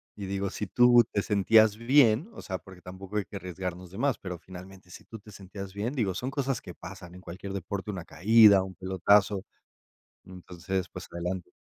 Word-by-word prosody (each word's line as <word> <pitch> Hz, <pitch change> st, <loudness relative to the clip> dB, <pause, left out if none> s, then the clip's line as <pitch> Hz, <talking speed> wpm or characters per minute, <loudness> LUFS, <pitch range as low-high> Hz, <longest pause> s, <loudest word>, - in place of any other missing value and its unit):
y 100 Hz, -2 st, -7 dB
digo, 100 Hz, 0 st, -2 dB
si 105 Hz, -, -4 dB
tú 120 Hz, +3 st, +6 dB
te 100 Hz, -, 0 dB
sentías 105 Hz, +1 st, +4 dB
bien, 120 Hz, -, +3 dB
o -, -, -10 dB
sea, 95 Hz, -2 st, -4 dB
porque 95 Hz, -2 st, -15 dB
tampoco 95 Hz, +3 st, -7 dB
hay 105 Hz, -, -1 dB
que 100 Hz, -, -8 dB
arriesgarnos 90 Hz, -1 st, -6 dB
de 95 Hz, -, -11 dB
más, 135 Hz, 0 st, 0 dB
pero 90 Hz, -2 st, -6 dB
finalmente, 95 Hz, +1 st, -13 dB
si -, -, -12 dB
tú 115 Hz, -, -10 dB
te 105 Hz, 0 st, -15 dB
sentías 95 Hz, 0 st, -9 dB
bien, 105 Hz, +4 st, -3 dB
digo, 105 Hz, -8 st, 0 dB
son 125 Hz, +8 st, -4 dB
cosas 135 Hz, -2 st, -2 dB
que 90 Hz, -, -10 dB
pasan 90 Hz, -1 st, -11 dB
en 90 Hz, -, -12 dB
cualquier 95 Hz, +2 st, -8 dB
deporte, 100 Hz, +1 st, -5 dB
una 90 Hz, -5 st, -5 dB
caída, 100 Hz, +4 st, +6 dB
un 95 Hz, -1 st, -7 dB
pelotazo. 95 Hz, +2 st, +2 dB, 0.8 s
Entonces, 90 Hz, 0 st, -5 dB
pues, -, -, -10 dB
adelante. 90 Hz, +1 st, -5 dB
95 Hz, 195 wpm, -28 LUFS, 90-105 Hz, 0.8 s, tú